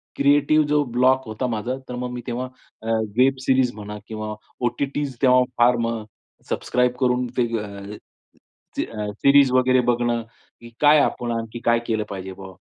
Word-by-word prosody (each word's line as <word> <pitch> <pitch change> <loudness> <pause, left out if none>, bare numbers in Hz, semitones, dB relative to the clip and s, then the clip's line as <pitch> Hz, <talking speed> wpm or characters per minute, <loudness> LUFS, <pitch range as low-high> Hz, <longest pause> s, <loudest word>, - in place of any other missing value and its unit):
Creative 145 +2 +3
जो 150 0 +2
block 130 +1 +2
होता 110 +4 -3
माझा, 120 +3 -3
तर 125 - -4
मग 125 0 -4
मी 125 0 -5
तेव्हा 125 +1 -3 0.4
अ, 110 - -9 0.3
वेब 130 +1 +4
सीरीज 130 -2 +3
म्हणा 105 0 -7
किंवा 110 -1 -5 0.3
ओ-टी-टीज 140 +3 -2
तेव्हा 125 -1 +5
फार 120 +1 +5
मग 115 -1 -3 0.5
सबस्क्राईब 125 0 +1
करून 125 -1 +1
ते 125 - +3
अ, 100 0 -8 0.8
सी - - 0 0.4
सीरीज 140 -1 +6
वगैरे 130 0 +4
बघणं 120 -1 0 0.4
की 120 - -11
काय 150 +1 +6
आपण 120 -3 -1
आणखी 115 +1 -6
काय 115 0 +4
केलं 110 -2 0
पाहिजे 95 -1 -6
बाबा? 95 0 -11
125 Hz, 160 wpm, -22 LUFS, 115-130 Hz, 0.8 s, सीरीज